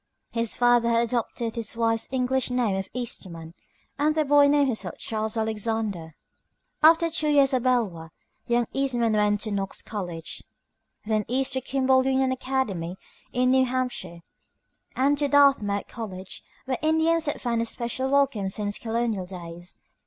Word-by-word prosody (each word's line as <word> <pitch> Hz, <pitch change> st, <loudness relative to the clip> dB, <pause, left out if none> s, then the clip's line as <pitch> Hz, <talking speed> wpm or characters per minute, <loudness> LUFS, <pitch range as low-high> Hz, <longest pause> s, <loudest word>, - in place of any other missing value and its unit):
His 230 Hz, -1 st, -1 dB
father 240 Hz, -1 st, +3 dB
had 230 Hz, 0 st, +3 dB
adopted 235 Hz, -1 st, -2 dB
his 230 Hz, -1 st, -3 dB
wife's 225 Hz, 0 st, 0 dB
English 260 Hz, 0 st, 0 dB
name 245 Hz, -5 st, 0 dB
of 195 Hz, 0 st, -4 dB
Eastman, 170 Hz, -9 st, -5 dB, 0.5 s
and 305 Hz, +1 st, +2 dB
the 310 Hz, -1 st, +2 dB
boy 285 Hz, 0 st, +5 dB
named 290 Hz, 0 st, +4 dB
himself 245 Hz, -5 st, -3 dB
Charles 220 Hz, 0 st, -3 dB
Alexander. 220 Hz, -6 st, -2 dB, 0.7 s
After 330 Hz, +2 st, +6 dB
two 310 Hz, -1 st, 0 dB
years 280 Hz, -2 st, +4 dB
at 255 Hz, -, +2 dB
Beloit, 220 Hz, -11 st, 0 dB, 0.4 s
young 240 Hz, 0 st, +2 dB
Eastman 245 Hz, -5 st, +1 dB
went -, -, +2 dB
on 205 Hz, 0 st, +2 dB
to 215 Hz, +1 st, -4 dB
Knox 195 Hz, -1 st, -2 dB
College, 175 Hz, -6 st, -5 dB, 0.6 s
Ill.; 220 Hz, -, -5 dB
then 210 Hz, -, -2 dB
east 265 Hz, +2 st, +1 dB
to 260 Hz, -, -1 dB
Kimball 260 Hz, 0 st, +2 dB
Union 265 Hz, 0 st, +1 dB
Academy 230 Hz, -10 st, -2 dB, 0.3 s
in 255 Hz, 0 st, +2 dB
New 260 Hz, 0 st, +4 dB
Hampshire, 245 Hz, -9 st, -3 dB, 0.7 s
and 280 Hz, +2 st, +2 dB
to 290 Hz, -, +2 dB
Dartmouth 275 Hz, -9 st, +3 dB
College, 190 Hz, -5 st, -8 dB, 0.2 s
where 260 Hz, -1 st, -2 dB
Indians 320 Hz, +1 st, +2 dB
had 290 Hz, -, -2 dB
found 235 Hz, -2 st, -1 dB
a -, -, 0 dB
special 240 Hz, +3 st, -3 dB
welcome 275 Hz, -8 st, +2 dB
since 205 Hz, +1 st, -2 dB
colonial 225 Hz, -5 st, -2 dB
days. 175 Hz, -1 st, -9 dB
235 Hz, 160 wpm, -25 LUFS, 205-265 Hz, 0.7 s, After